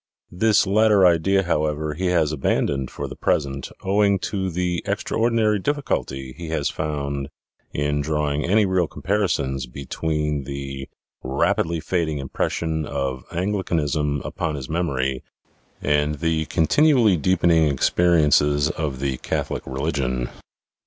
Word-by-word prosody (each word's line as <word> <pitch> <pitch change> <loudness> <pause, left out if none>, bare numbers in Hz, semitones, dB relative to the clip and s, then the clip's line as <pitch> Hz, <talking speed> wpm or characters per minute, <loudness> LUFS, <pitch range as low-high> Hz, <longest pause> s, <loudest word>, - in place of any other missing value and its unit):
This 105 +3 +3
latter 105 0 +4
idea, 90 +3 +3
however, 75 -2 -1
he 90 +5 -2
has 85 -4 +2
abandoned 70 -2 0
for - - -5
the - - -8
present, 70 -2 -1
owing 100 +1 +3
to 95 -2 -1
the 90 0 -1
extraordinary 110 -2 +1
difficulty 65 - -2
he 85 - -7
has 75 -3 -1
found 70 -2 -3 0.4
in 75 0 0
drawing 75 0 -1
any 105 +4 +3
real 95 -3 +1
comparisons 75 -11 -1
between 75 +2 -2
the 70 -1 -6 0.3
rapidly 75 +5 0
fading 80 -2 -1
impression 80 +3 -2
of 70 -3 -3
Anglicanism 80 -7 -1
upon 75 - -3
his 65 -3 -6
memory, 70 -6 -1 0.6
and 75 +1 +1
the 80 +1 0
continually 115 - +4
deepening 85 0 +3
experi 85 +6 +3
viii - - +3
PREFACE - - +7
ences 75 +1 +1
of 70 -5 -4
the 70 -2 -1
Catholic - - -3
religion. 65 -3 -2
75 Hz, 130 wpm, -23 LUFS, 70-90 Hz, 0.6 s, PREFACE